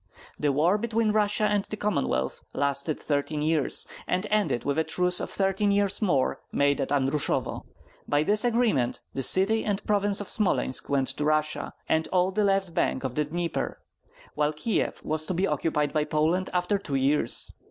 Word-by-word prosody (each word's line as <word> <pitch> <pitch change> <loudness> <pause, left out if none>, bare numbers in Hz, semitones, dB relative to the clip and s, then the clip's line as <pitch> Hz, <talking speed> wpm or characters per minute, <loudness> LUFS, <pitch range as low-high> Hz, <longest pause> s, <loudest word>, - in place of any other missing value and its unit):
The 145 - +1
war 165 +9 +2
between 225 -1 0
Russia 210 0 +1
and 205 -1 +2
the 215 - -6
Commonwealth 140 - -1
lasted 140 +2 0
thirteen 150 +1 -2
years, 155 -2 +1 0.2
and 185 +3 -1
ended 210 - +1
with 140 +2 0
a - - +2
truce 180 +2 +3
of - - -4
thirteen 195 +1 0
years 200 0 +1
more, 145 -11 +1
made 140 0 +1
at 135 - -3
Andrusovo. 140 +1 0 0.4
By 145 +1 +2
this 210 +6 +3
agreement 225 - +1
the 135 - -3
city 195 - +3
and 200 -1 -2
province 205 -1 +1
of 205 - -5
Smolensk 190 -10 +1
went 135 -2 +1
to - - -3
Russia, 155 0 0
and 160 0 +1
all 185 0 +1
the 210 +2 0
left 195 -3 +1
bank 130 - 0
of 130 -2 -3
the 150 +3 0
Dnieper, 170 +3 -3 0.5
while 150 0 0
Kieff 190 +9 -2
was 155 0 -1
to 185 - -2
be 185 +3 +1
occupied 150 -6 -1
by 150 -1 +1
Poland 155 +5 0
after 180 +3 0
two 145 -8 -4
years. 135 +3 +2
170 Hz, 180 wpm, -26 LUFS, 145-205 Hz, 0.5 s, truce